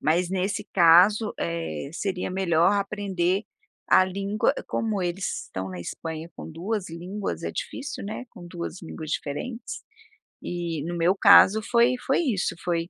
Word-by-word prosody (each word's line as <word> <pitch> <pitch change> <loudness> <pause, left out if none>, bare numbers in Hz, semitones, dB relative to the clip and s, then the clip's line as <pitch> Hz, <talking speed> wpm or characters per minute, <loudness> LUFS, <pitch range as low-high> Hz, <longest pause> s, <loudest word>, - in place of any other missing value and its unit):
Mas 170 +3 +2
nesse 195 +2 -1
caso, 185 +5 +5
eh, 85 - -3
seria 185 0 -3
melhor 180 -1 +3
aprender 195 -2 0 0.5
a 185 - +6
língua 200 +4 0
como 215 -3 -1
eles 180 +2 -3
estão 95 0 -5
na 90 -1 -6
Espanha 160 - -6
com - - -8
2 190 +5 -3
línguas, 185 +5 -5
é - - -2
difícil, 275 -5 -5
né, 215 +5 -5
com 175 - -12
2 175 0 -6
línguas 160 -1 -7
diferentes. 230 - -4 0.6
E, 170 -4 -3
no 175 - -3
meu 175 +4 +3
caso, 200 +1 +7
foi 235 +3 +3
foi 270 - +2
isso, 235 - 0
foi 170 -1 -1
185 Hz, 150 wpm, -25 LUFS, 165-205 Hz, 0.6 s, caso